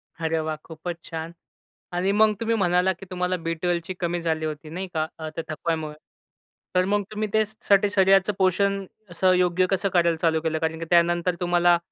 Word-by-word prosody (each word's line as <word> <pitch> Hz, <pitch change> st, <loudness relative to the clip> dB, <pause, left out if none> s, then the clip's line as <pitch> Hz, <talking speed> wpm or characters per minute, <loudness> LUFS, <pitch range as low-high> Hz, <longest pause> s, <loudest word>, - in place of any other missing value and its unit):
अरे 160 Hz, 0 st, -1 dB
वाह! 155 Hz, 0 st, -2 dB
खूपच 165 Hz, +1 st, -6 dB
छान 165 Hz, 0 st, -5 dB, 0.6 s
आणि 180 Hz, +2 st, +1 dB
मग 215 Hz, +1 st, +4 dB
तुम्ही 230 Hz, 0 st, 0 dB
म्हणालात 180 Hz, -2 st, +2 dB
की 195 Hz, -, -9 dB
तुम्हाला 180 Hz, 0 st, -1 dB
बी12ची 170 Hz, +2 st, -1 dB
कमी 175 Hz, 0 st, -1 dB
झाली 160 Hz, -1 st, -1 dB
होती, 155 Hz, 0 st, -5 dB
नाही 185 Hz, +4 st, -5 dB
का, 155 Hz, -1 st, 0 dB
अ, 160 Hz, -1 st, -4 dB
त्या 165 Hz, -, -3 dB
थकवायामुळे. 155 Hz, 0 st, -3 dB, 0.8 s
तर 180 Hz, 0 st, +4 dB
मग 205 Hz, +1 st, +1 dB
तुम्ही 215 Hz, 0 st, -2 dB
त्यासाठी, 210 Hz, -2 st, +2 dB
शरीराचं 195 Hz, 0 st, +4 dB
पोषण 195 Hz, +1 st, +2 dB, 0.2 s
असं 185 Hz, +2 st, +2 dB
योग्य 180 Hz, 0 st, +2 dB
कसं 195 Hz, +1 st, +1 dB
करायला 170 Hz, -2 st, +3 dB
चालू 160 Hz, -1 st, +1 dB
केलं, 160 Hz, -1 st, -1 dB
कारण 160 Hz, 0 st, -2 dB
की 165 Hz, -, -4 dB
त्यानंतर 175 Hz, +1 st, +3 dB
तुम्हाला 175 Hz, 0 st, +4 dB
175 Hz, 175 wpm, -24 LUFS, 165-190 Hz, 0.8 s, मग